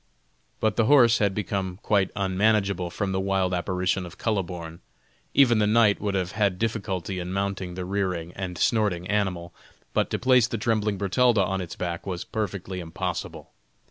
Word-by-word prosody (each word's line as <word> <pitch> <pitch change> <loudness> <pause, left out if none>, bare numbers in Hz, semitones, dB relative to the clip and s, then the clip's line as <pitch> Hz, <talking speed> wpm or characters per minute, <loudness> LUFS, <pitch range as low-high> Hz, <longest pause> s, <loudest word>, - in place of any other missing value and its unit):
But 110 -2 0
the 115 - +3
horse 120 -3 +6
had 100 -3 +1
become 95 -2 -2
quite 100 -3 +2
unmanageable 100 -2 +1
from 95 +3 -3
the 95 - 0
wild 95 -1 0
apparition 90 +1 0
of 85 -1 -10
Kuhleborn. 90 -6 -3 0.6
Even 120 -5 +5
the 105 - +3
knight 105 -1 +4
would 100 -1 -1
have 90 -2 -1
had 100 -4 +1
difficulty 100 -4 -2
in 90 +1 -5
mounting 95 -2 -2
the 90 0 -4
rearing 90 -3 -2
and 95 -2 -5
snorting 105 -7 +1
animal, 90 -4 -1 0.4
but - - +1
to - - -1
place 125 -2 +4
the 115 - -3
trembling 105 -2 0
Bertalda 105 +3 +3
on 95 +1 -2
its 85 -3 -7
back 85 0 -4
was 90 -2 -3
perfectly 100 -3 -4
impossible. 80 -2 -5
95 Hz, 170 wpm, -25 LUFS, 90-105 Hz, 0.6 s, horse